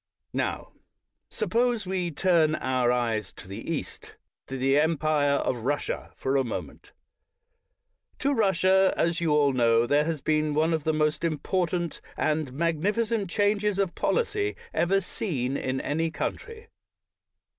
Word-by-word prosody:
Now, - - -2 0.6
suppose 235 -2 0
we 185 -2 -1
turn 165 -1 +2
our 125 -3 +1
eyes 115 -5 -1
to - - -13
the 100 - -6
East, 160 - -6 0.3
to 135 - -5
the 135 +2 +3
empire 155 -2 +2
of 130 - 0
Russia, 145 +3 -2
for 135 +1 -1
a 135 - +2
moment. 120 - -6 1.3
In 280 - +4
Russia, 190 -2 +3
as 170 0 +1
you 165 -2 +1
all 145 -2 +3
know, 115 -2 +3
there 145 +4 +2
has 165 -2 -2
been 155 0 0
one 160 +2 +2
of 160 -2 -2
the 160 - +3
most 155 +1 0
important 170 +2 -1 0.2
and 155 -3 0
magnificent 195 - 0
changes 205 +1 +1
of 195 -3 0
policy 420 -4 0 0.2
ever 195 +3 +2
seen 140 - -2
in 130 -1 -2
any 160 +4 -1
country. 460 - -5
160 Hz, 140 wpm, -27 LUFS, 140-190 Hz, 1.3 s, In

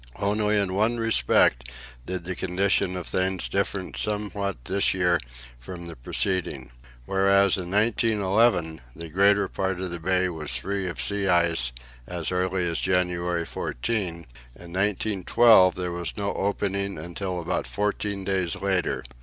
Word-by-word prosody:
Only 105 +1 +1
in 100 -2 0
one 110 +5 +1
respect 60 - +3 0.4
did 90 -1 -4
the 90 +2 -3
condition 95 +1 0
of 90 - -5
things 95 0 -1
differ 100 -1 -2
somewhat 100 - -3
this 95 0 +1
year 90 -2 +2 0.4
from 85 +8 -8
the 85 - -8
preceding. 70 0 -2 0.3
Whereas 100 +1 +4
in 90 -2 -4
1911 105 - +2
the 85 0 -5
greater 100 +3 +3
part 95 -1 -2
of 95 -1 -4
the 85 - -3
bay 95 +2 +1
was 75 -6 -3
free 95 +6 -3
of 85 -7 -5
sea 100 +10 0
ice 85 -8 +2 0.4
as 85 -1 -3
early 90 0 0
as 85 - 0
January 90 -2 0
14, 105 - -2
in 85 - -6 0.4
1912 95 +2 +3
there 90 -1 -3
was 85 +3 -4
no 100 -1 -1
opening 100 -1 -2
until 90 +3 -4
about 85 +1 -2
fourteen 105 -1 -2
days 95 -2 0
later. 95 -2 -1
95 Hz, 145 wpm, -25 LUFS, 85-100 Hz, 0.4 s, Whereas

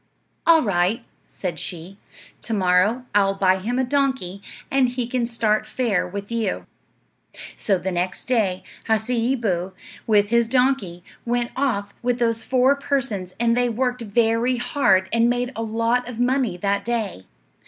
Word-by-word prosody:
"All 330 -1 +6
right," 195 +1 0 0.2
said 175 -4 -5
she; 180 +3 -7 0.4
"to 225 - -3
morrow 195 +6 +2
I'll 195 -1 +3
buy 190 -1 +3
him 235 +6 -2
a 260 - +2
donkey, 260 -8 -1 0.3
and 270 -2 +3
he 250 0 -2
can 245 0 -1
start 225 -2 0
fair 230 -9 0
with 200 +3 -7
you." 225 -4 -2 0.9
So 195 -3 +1
the 190 +1 -3
next 180 +1 -2
day 210 -7 0 0.3
Hasseeboo, 220 -5 0 0.3
with 205 -2 +3
his 235 0 +2
donkey, 250 -10 +1 0.2
went 240 0 -1
off 205 -7 -1
with 245 0 0
those 230 -2 0
four 260 +2 +3
persons, 260 -10 -2
and 230 0 +2
they 245 0 +2
worked 250 +1 -1
very 230 +3 +1
hard 205 -7 +2
and 230 +1 +4
made 245 +1 -1
a 225 - -3
lot 230 +2 0
of 240 - -7
money 245 -6 +1
that 200 +2 0
day. 220 - -3
230 Hz, 155 wpm, -22 LUFS, 195-245 Hz, 0.9 s, All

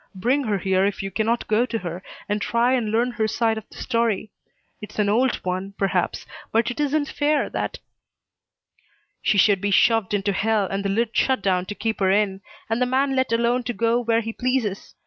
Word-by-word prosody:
Bring 255 +9 +1
her 210 -3 0
here 190 0 +1
if 200 0 -1
you 195 - -4
cannot 225 +4 0
go 215 +2 +3
to 230 - -2
her, 175 -3 -6 0.3
and 205 0 -1
try 235 +4 +2
and 240 -4 0
learn 235 +3 +1
her 220 -2 -1
side 225 0 0
of - - -18
the - - -14
story. 230 -4 -1 0.5
It's 210 - -10
an 210 -1 +2
old 245 +5 +2
one, 185 +2 -3
perhaps, 195 -1 -1 0.3
but 230 +2 +2
it 245 - -8
isn't 295 0 +1
fair 295 -1 0
that - - -3 0.8
" - - -41
"She 205 - +2
should 195 0 +4
be 205 - 0
shoved 215 0 +3
into 200 0 0
hell 215 +1 +1
and 195 +1 -3
the 200 - -1
lid 225 +3 0
shut 260 -7 +2
down 185 -1 +1
to 205 - -5
keep 225 +1 -2
her 190 -1 +2
in, 195 -1 +1 0.3
and 225 +2 -1
the 250 - +3
man 270 +2 +1
let 260 -2 +1
alone 235 +2 +2
to 245 - -2
go 230 +2 +1
where 230 -1 +1
he 225 0 -5
pleases. 245 -6 -2
220 Hz, 215 wpm, -23 LUFS, 200-240 Hz, 0.8 s, should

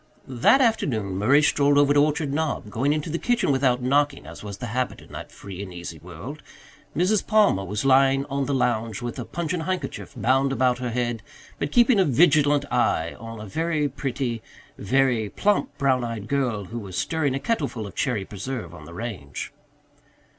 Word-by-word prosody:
That 130 - +4
afternoon 115 - +1
Murray 140 +9 +4
strolled 145 -1 +3
over 145 0 +5
to 145 0 +5
Orchard 150 -1 0
Knob, 145 -8 -2
going 130 +6 +1
into 150 +1 -2
the 170 - -2
kitchen 240 -10 +1
without 130 -2 +2
knocking 140 +2 +1
as 80 +4 -10
was 100 -2 -6
the 125 - -5
habit 125 0 -1
in - - -16
that - - -8
free 100 -1 -9
and 100 -2 -7
easy 85 -2 -8
world. 90 - -9 0.6
Mrs. 190 +4 +2
Palmer 210 - +4
was 105 +6 -3
lying 135 0 +4
on 140 -1 -2
the 145 - 0
lounge 115 -3 0
with 120 +2 -4
a 120 - -4
pungent 170 +2 -3
handkerchief 185 0 -4
bound 130 +4 +2
about 125 -2 +2
her 125 -1 -2
head, 120 -1 -2 0.4
but 145 - -2
keeping 240 - +5
a - - +6
vigilant 145 0 +4
eye 85 -8 +1
on 115 0 -8
a 105 - -7
very 155 - 0
pretty, 130 -3 -3 0.3
very 120 -1 +1
plump 205 - 0
brown 130 -3 +2
eyed 115 -3 -5
girl 125 -7 -1
who 115 +5 -6
was 95 -4 -7
stirring 150 -5 0
a - - -1
kettleful 135 - -2
of 100 - -9
cherry 115 -7 -1
preserve 105 -3 -6
on 80 -3 -11
the 85 +2 -11
range. 95 -10 -6
130 Hz, 190 wpm, -24 LUFS, 110-145 Hz, 0.6 s, a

